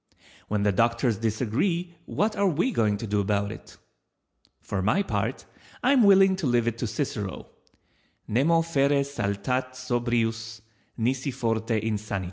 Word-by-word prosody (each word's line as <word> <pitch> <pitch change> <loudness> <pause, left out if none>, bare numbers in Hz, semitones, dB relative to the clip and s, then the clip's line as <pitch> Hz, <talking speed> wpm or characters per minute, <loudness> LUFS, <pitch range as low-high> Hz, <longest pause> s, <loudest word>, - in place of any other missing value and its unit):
When 105 -1 -1
the 105 - +3
doctors 115 +2 +1
disagree 130 - -1
what 215 +1 0
are 200 -1 +2
we 180 - +1
going 105 - +1
to 115 - -5
do 105 -1 0
about 100 0 0
it? - - -12 0.8
For 100 -2 -3
my 110 - +2
part - - -2 0.4
I 260 +3 +4
am 265 - +5
willing 195 -2 +6
to 170 -7 -1
leave 120 -2 +2
it 115 0 -2
to 120 - -1
Cicero— 105 -5 -4 0.8
"_Nemo 165 +9 +2
fere 140 -3 +2
saltat 130 0 -2
sobrius, 115 -3 -1 0.4
nisi 130 +4 0
forte 115 -3 -1
insanit. 105 -2 -2
120 Hz, 145 wpm, -26 LUFS, 110-145 Hz, 0.8 s, willing